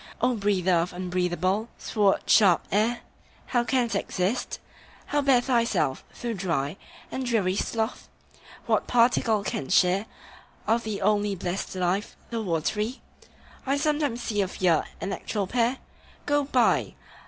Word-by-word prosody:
O 250 +2 +2
breather 195 -3 +1
of 170 +2 -1
unbreathable, 180 +3 -1
sword 205 -3 +1
sharp 195 -6 +5
air, 220 +4 +1 0.4
How 240 -2 +1
canst 240 -3 0
exist? 195 +3 -1 0.5
How 290 - 0
bear 270 -3 +4
thyself, 230 - +1 0.2
thou 235 -1 -1
dry 170 -5 -2 0.3
And 265 - -3
dreary 215 -7 +1
sloth? 225 +3 -2 0.6
What - - +1
particle 230 -3 +3
canst 140 - 0
share 190 +4 +3 0.6
Of 225 +2 +1
the 210 -3 -3
only 205 0 +2
blessed 185 +1 -4
life, 185 +2 -1 0.2
the 230 -1 -2
watery? 210 - -1 0.7
I 275 +1 +2
sometimes 290 -5 0
see 210 -2 0
of 190 -1 -4
ye 185 - +3 0.3
an 195 - -3
actual 205 -3 -2
pair 240 +5 +1 0.5
Go 290 -1 +2
by! 255 -3 +2
210 Hz, 135 wpm, -26 LUFS, 185-240 Hz, 0.7 s, sharp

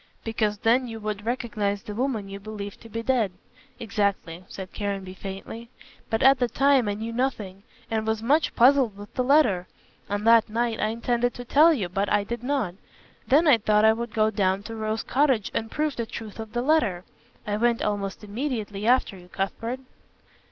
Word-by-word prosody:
"Because 220 -2 -1
then 240 +4 +2
you 225 -1 -7
would 210 0 -5
recognize 215 -5 -2
the 210 - -6
woman 230 -3 -2
you 195 0 -7
believed 205 -1 -7
to 230 - -12
be 230 +1 -4
dead." 235 -6 +1 0.5
"Exactly," 200 -6 -2
said 190 -1 -8
Caranby 195 -2 -4
faintly, 195 +5 -8 0.4
"but 225 -1 0
at 270 0 +6
the 245 - +2
time 270 -1 +3
I 205 - -1
knew 225 +2 -5
nothing, 220 -7 -2 0.3
and 220 -1 -1
was 220 0 -1
much 295 +6 +2
puzzled 250 -4 +4
with 205 0 -11
the 255 - 0
letter. 250 -10 +3 0.4
On 205 +1 -2
that 230 -1 +5
night 230 +1 -1
I 215 - +1
intended 240 +2 -1
to 245 - -8
tell 305 +7 +6
you, 225 - 0
but 195 +3 -2
I 205 -1 +3
did 235 +3 -5
not. 250 -8 -1 0.5
Then 305 +5 +4
I 260 -6 +6
thought 210 0 +3
I 220 - +6
would 235 0 -5
go 215 0 +3
down 195 -1 0
to 225 +1 -7
Rose 220 0 -2
Cottage 260 -6 +1
and 225 - -2
prove 305 +1 -1
the 230 -1 -3
truth 220 -1 -8
of 220 -1 -7
the 240 0 -1
letter. 235 - +2 0.4
I 210 0 -1
went 235 +1 +1
almost 205 -1 -2
immediately 215 -2 -3
after 250 -4 +3
you, 180 -1 -14
Cuthbert." 225 +7 -3
220 Hz, 195 wpm, -25 LUFS, 205-245 Hz, 0.5 s, at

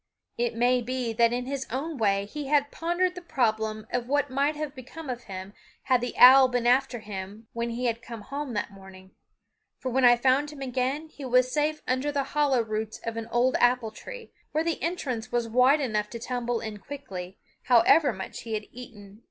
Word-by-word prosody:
It 240 -1 -1
may 245 +2 +3
be 245 -1 -2
that 230 +1 +3
in 245 +1 -2
his 270 0 -4
own 285 +7 -3
way 200 -2 +2
he 290 +7 -6
had 285 0 +2
pondered 350 +2 0
the 360 - -8
problem 220 -8 -1
of 245 -1 -1
what 285 0 +1
might 280 +3 +1
have 300 -2 -4
become 270 +2 -8
of 245 -1 -7
him 190 0 -8 0.3
had 255 -2 +2
the 245 - -4
owl 260 +1 +9
been 245 -1 -1
after 250 -1 +2
him 205 +1 -7
when 235 0 -2
he 235 0 0
came 230 -1 -10
home 275 +1 -5
that 205 - -2
morning; 190 -1 -14 0.7
for 260 - -4
when 260 +2 +1
I 240 -1 +8
found 265 +4 +2
him 295 - -11
again 265 +4 -2
he 295 - -11
was 255 0 +3
safe 305 +1 0
under 260 +3 0
the 285 -1 0
hollow 285 -5 +3
roots 215 0 -4
of 230 0 -3
an 225 -1 -5
old 250 +2 +2
apple 245 -2 +3
tree, - - -10 0.2
where 310 +2 +1
the 330 -1 -2
entrance 255 -9 -3
was 240 -1 0
wide 255 +6 +4
enough 210 -5 -1
to 235 - -7
tumble 245 -1 -2
in 215 -2 -6
quickly, 195 -9 -8 0.3
however 250 +4 +5
much 190 -3 -7
he 225 -2 -4
had 210 -1 -4
eaten. 215 -5 -12
245 Hz, 200 wpm, -27 LUFS, 225-275 Hz, 0.7 s, owl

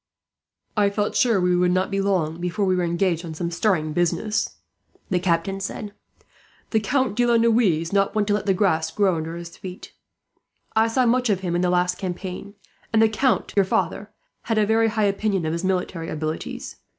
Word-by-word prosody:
"I 205 -2 +3
felt 205 +1 -2
sure 230 -5 +3
we 180 0 +2
should 180 0 +3
not 185 +2 0
be 195 0 0
long 175 -4 0
before 180 +4 -1
we 185 -1 +2
were 180 - 0
engaged 170 0 0
on 160 -2 -7
some 170 +2 -3
stirring 165 -5 0
business," 175 +6 0 0.6
the 180 - +2
Captain 175 +2 0
said. 205 +1 -5 0.8
"The 220 - +3
Count 260 0 0
de 245 +1 +2
la 235 -1 +4
Noue 230 0 +4
is 170 -6 +1
not 200 +1 +2
one 210 -1 +2
to 205 - +1
let 205 0 -1
the 195 - +3
grass 165 -5 +1
grow 190 -1 +1
under 160 +1 -4
his 170 0 -8
feet. 185 0 -9 0.8
I 220 +1 +4
saw 250 +3 +2
much 250 +1 +2
of 195 -3 +1
him 175 -2 -2
in 175 - +1
the 180 - +2
last 180 0 +1
campaign; 190 +2 -5 0.4
and 220 - +3
the 225 0 +5
count, 250 +3 0
your 200 - +5
father, 190 - -1 0.4
had 225 -2 0
a 215 - +4
very 225 +1 +3
high 215 -1 0
opinion 200 -3 0
of 155 - -1
his 170 +2 -3
military 180 -3 -2
abilities. 155 0 -5
190 Hz, 205 wpm, -23 LUFS, 175-215 Hz, 0.8 s, the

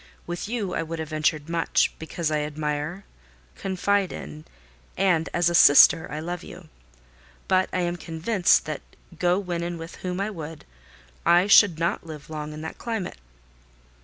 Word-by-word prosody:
With 175 +4 -5
you 220 -6 -2
I - - -1
would 165 0 -5
have 160 -1 -5
ventured 155 -1 0
much, 165 0 +1
because 160 0 -3
I 155 - +1
admire, 150 +4 -3 0.5
confide 195 0 0
in, 75 +1 -8 0.5
and, 180 -4 +2
as 175 -1 +2
a 175 - +1
sister, 160 0 +7
I 150 - -4
love 175 +2 -5
you; - - -12 0.8
but 185 -1 +2
I 185 - -1
am 175 0 -1
convinced 175 +4 +1
that, 150 -2 -4 0.4
go 180 0 +2
when 180 -4 -3
and 170 0 -4
with 165 +1 -9
whom 180 0 -4
I 200 +2 -1
would, 160 -4 -8 0.6
I 175 +2 +5
should 200 -4 +6
not 170 +1 -1
live 155 -2 -10
long 150 -1 -5
in 150 0 -8
that 160 - -7
climate." 225 - -4
170 Hz, 165 wpm, -25 LUFS, 155-185 Hz, 0.8 s, sister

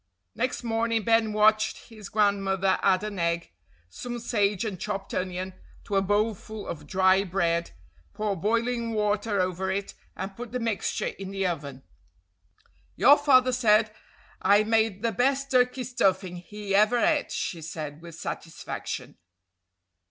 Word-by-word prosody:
Next 255 0 -2
morning 225 -1 0
Ben 225 -1 +3
watched 215 +2 +2
his 215 -3 -10
grandmother 195 -2 +2
add 190 0 +3
an 210 -3 -4
egg, 170 - -1 0.4
some 240 - -6
sage 210 -3 0
and 195 -5 -4
chopped 195 0 -4
onion 185 0 -3 0.3
to 200 - -4
a 195 - +4
bowlful 210 +1 -1
of 155 - -7
dry 190 +1 +4
bread, 170 -3 0 0.5
pour 210 -2 -1
boiling 230 +4 0
water 210 -1 0
over 185 +1 -1
it, 195 +1 -3 0.2
and 195 +1 -6
put 240 +1 -8
the 250 - -1
mixture 230 -4 -1
in 195 -1 -6
the 195 0 -2
oven. 140 -6 -4 1.1
"Your 285 - +7
father 255 -3 +4
said 215 -3 +3 0.5
I 205 +2 +5
made 220 -2 +1
the 230 - +2
best 270 +5 0
turkey 250 0 +2
stuffing 190 -7 0
he 205 +3 -6
ever 215 +4 +4
ate," 300 +4 +2
she 170 -4 -3
said 155 -1 -6
with 170 -1 -10
satisfaction. 165 0 -6
205 Hz, 145 wpm, -27 LUFS, 190-230 Hz, 1.1 s, Your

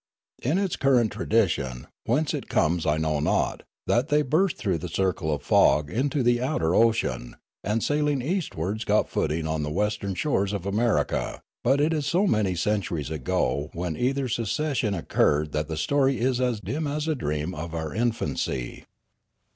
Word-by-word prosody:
It 145 +9 +1
is 195 -2 0
the - - -2
current 125 -5 +3
tradition, 75 - 0 0.2
whence 145 +6 +1
it - - -5
comes 85 +1 +1
I 75 +1 +2
know 80 -1 0
not, 75 - 0 0.2
that 120 +4 +2
they 150 0 +3
burst 160 +6 +1
through 95 -7 -1
the 90 +2 -5
circle 90 -3 0
of 75 - -2
fog 75 -1 +4
into 140 +3 0
the 120 0 +3
outer 125 - 0
ocean, 115 - +1 0.3
and 105 +2 0
sailing 150 -1 +1
eastwards 120 - -2
got 105 0 +2
footing 80 +1 -1
on 80 -1 -1
the 75 - -2
western 100 +3 -1
shores 100 -6 0
of 100 -3 -4
America; 100 - 0 0.2
but 135 +3 +3
it 155 +3 +2
is 150 -3 -1
so 180 +7 +2
many 105 - +1
centuries 85 -6 -1
ago 75 0 -1
when 85 -1 -3
either 135 - 0
secession 115 0 -1
occurred 75 -3 +1
that 75 0 -2
the 80 -1 -4
story 135 - +2
is 125 +1 +1
as 125 -4 0
dim 140 - -3
as 150 +2 -2
a 160 - +2
dream 75 - -2
of 85 0 -6
our 80 -1 -4
infancy. 110 - -2
105 Hz, 175 wpm, -26 LUFS, -, 0.3 s, fog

